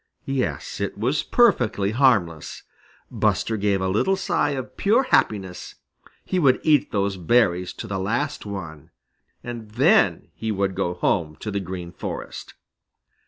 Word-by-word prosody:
Yes, 135 Hz, -2 st, -3 dB
it 100 Hz, -, -3 dB
was 125 Hz, +8 st, 0 dB
perfectly 115 Hz, -, +2 dB
harmless. 105 Hz, -, +1 dB, 0.5 s
Buster 115 Hz, -, 0 dB
gave 100 Hz, -2 st, 0 dB
a 95 Hz, -, 0 dB
little 110 Hz, -, +2 dB
sigh 180 Hz, -5 st, 0 dB
of 135 Hz, -3 st, -5 dB
pure 225 Hz, +6 st, +3 dB
happiness. 95 Hz, -, 0 dB, 0.5 s
He 185 Hz, -, 0 dB
would 135 Hz, -6 st, +4 dB
eat 150 Hz, -4 st, +3 dB
those 100 Hz, -1 st, 0 dB
berries 90 Hz, -1 st, +2 dB
to -, -, -7 dB
the 100 Hz, -3 st, -3 dB
last 115 Hz, +10 st, -2 dB
one, 85 Hz, -8 st, -7 dB, 0.5 s
and 120 Hz, -3 st, -7 dB
then 145 Hz, -, +3 dB
he 110 Hz, 0 st, -3 dB
would 100 Hz, -1 st, 0 dB
go 90 Hz, -1 st, -2 dB
home 80 Hz, -3 st, 0 dB
to 105 Hz, -, -4 dB
the 100 Hz, -, -1 dB
Green 90 Hz, -2 st, -6 dB
Forest. -, -, -7 dB
105 Hz, 145 wpm, -23 LUFS, 95-135 Hz, 0.5 s, would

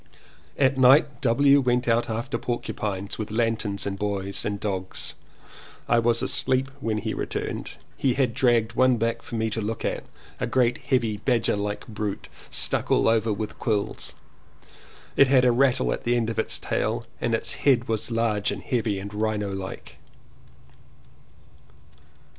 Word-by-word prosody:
At 135 Hz, -1 st, +3 dB
night 135 Hz, +1 st, +5 dB
W. 140 Hz, +3 st, +4 dB
went 125 Hz, -1 st, +1 dB
out 115 Hz, +1 st, +2 dB
after 115 Hz, +1 st, -2 dB
porcupines 105 Hz, -5 st, -3 dB
with 110 Hz, -, -3 dB
lanterns 110 Hz, -2 st, -1 dB
and 100 Hz, -1 st, -3 dB
boys 100 Hz, -1 st, -2 dB
and 100 Hz, -1 st, -2 dB
dogs. 95 Hz, -3 st, -3 dB, 0.7 s
I 120 Hz, -, +4 dB
was 115 Hz, 0 st, +2 dB
asleep 130 Hz, +1 st, +1 dB
when 110 Hz, -5 st, -1 dB
he 105 Hz, -, -2 dB
returned. -, -, -4 dB, 0.2 s
He 130 Hz, -3 st, +1 dB
had 130 Hz, -4 st, +1 dB
dragged 120 Hz, -3 st, +2 dB
one 130 Hz, 0 st, +4 dB
back 115 Hz, +1 st, -1 dB
for 115 Hz, -, -8 dB
me 110 Hz, 0 st, -1 dB
to 110 Hz, -, -2 dB
look 110 Hz, +2 st, -3 dB
at -, -, -2 dB, 0.2 s
— -, -, -24 dB
a 125 Hz, -, -1 dB
great 125 Hz, 0 st, +2 dB
heavy 120 Hz, -6 st, 0 dB
badger 115 Hz, +1 st, +1 dB
like 105 Hz, 0 st, -3 dB
brute 105 Hz, -2 st, -4 dB, 0.2 s
stuck -, -, 0 dB
all -, -, +3 dB
over 115 Hz, -1 st, +2 dB
with 105 Hz, +1 st, -4 dB
quills. 105 Hz, -3 st, -2 dB, 1.0 s
It 140 Hz, -, +6 dB
had 130 Hz, -1 st, +5 dB
a 125 Hz, -, +5 dB
rattle 130 Hz, +1 st, +3 dB
at -, -, -6 dB
the 120 Hz, +1 st, +2 dB
end 115 Hz, -1 st, 0 dB
of 115 Hz, -, -3 dB
its -, -, 0 dB
tail -, -, -1 dB, 0.2 s
and -, -, +1 dB
its -, -, -1 dB
head 125 Hz, -4 st, +3 dB
was 110 Hz, 0 st, -1 dB
large 115 Hz, -3 st, 0 dB
and -, -, -4 dB
heavy 115 Hz, -6 st, -1 dB
and 100 Hz, +2 st, -7 dB
Rhino 105 Hz, -2 st, -1 dB
like. 95 Hz, -1 st, -7 dB
115 Hz, 165 wpm, -25 LUFS, 105-125 Hz, 1.0 s, It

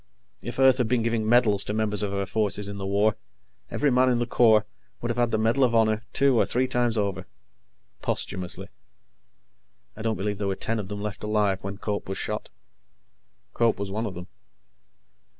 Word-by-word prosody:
If 120 Hz, +2 st, -6 dB
Earth 130 Hz, -1 st, +5 dB
had 125 Hz, -, +2 dB
been 115 Hz, 0 st, +1 dB
giving 115 Hz, -1 st, 0 dB
medals 110 Hz, -5 st, +4 dB
to 105 Hz, -, -3 dB
members 105 Hz, -2 st, 0 dB
of 100 Hz, -1 st, -1 dB
her 100 Hz, 0 st, -1 dB
forces 105 Hz, -1 st, -1 dB
in 100 Hz, 0 st, -6 dB
the 95 Hz, -, -4 dB
war, 105 Hz, +2 st, +2 dB, 0.5 s
every 145 Hz, -2 st, +1 dB
man 130 Hz, +1 st, +4 dB
in 125 Hz, -, +2 dB
the 120 Hz, -, 0 dB
Corps 110 Hz, -3 st, +4 dB, 0.3 s
would 120 Hz, -, -2 dB
have 120 Hz, -, -4 dB
had 120 Hz, -1 st, +2 dB
the 110 Hz, -, 0 dB
Medal 115 Hz, +5 st, +2 dB
of 120 Hz, -2 st, +2 dB
Honor 110 Hz, -1 st, +3 dB
two 135 Hz, -4 st, +3 dB
and -, -, 0 dB
three 130 Hz, +2 st, +1 dB
times 120 Hz, -2 st, 0 dB
over. 100 Hz, -3 st, -2 dB, 0.7 s
Posthumously. 90 Hz, -1 st, -2 dB, 1.3 s
I 110 Hz, -, -9 dB
don't 110 Hz, 0 st, -1 dB
believe 100 Hz, 0 st, -3 dB
there 100 Hz, -, -1 dB
were 95 Hz, -, -1 dB
ten 115 Hz, +3 st, -2 dB
of 100 Hz, -, -5 dB
them 100 Hz, 0 st, -6 dB
left 105 Hz, -1 st, -5 dB
alive 105 Hz, -3 st, +1 dB
when 100 Hz, +1 st, -5 dB
Cope 105 Hz, -1 st, -4 dB
was 95 Hz, -, -3 dB
shot. -, -, -4 dB, 1.0 s
Cope 115 Hz, -1 st, +2 dB
was 100 Hz, -1 st, -4 dB
one 110 Hz, +3 st, -2 dB
of 95 Hz, -, -7 dB
them. 90 Hz, 0 st, -7 dB
110 Hz, 200 wpm, -26 LUFS, 100-120 Hz, 1.3 s, Earth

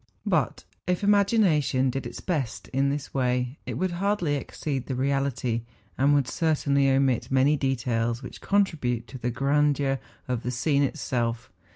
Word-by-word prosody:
But -, -, 0 dB, 0.2 s
if 180 Hz, -1 st, 0 dB
imagina¬ 200 Hz, -5 st, +4 dB
tion 130 Hz, -1 st, +1 dB
did 135 Hz, +2 st, -4 dB
its -, -, -8 dB
best 145 Hz, -10 st, -3 dB
in 135 Hz, +1 st, +1 dB
this 145 Hz, 0 st, -4 dB
way, 125 Hz, 0 st, 0 dB
it -, -, -3 dB
would 185 Hz, 0 st, -1 dB
hardly 180 Hz, -3 st, 0 dB
exceed 140 Hz, -1 st, -4 dB
the 130 Hz, -, -2 dB
reality, 130 Hz, -3 st, 0 dB, 0.3 s
and 140 Hz, +3 st, +3 dB
would 140 Hz, -3 st, +2 dB
certainly 140 Hz, -3 st, +2 dB
omit 135 Hz, -2 st, +2 dB
many 135 Hz, +3 st, +4 dB
details 120 Hz, -3 st, -1 dB
which 125 Hz, -, -9 dB
contribute 150 Hz, -, +1 dB
to 130 Hz, -, -8 dB
the 120 Hz, +1 st, -1 dB
grandeur 140 Hz, +1 st, +1 dB, 0.3 s
of 125 Hz, -3 st, -1 dB
the 125 Hz, -, -3 dB
scene 140 Hz, +4 st, +1 dB
itself. 120 Hz, -4 st, -1 dB
135 Hz, 160 wpm, -26 LUFS, 125-150 Hz, 0.3 s, imagina¬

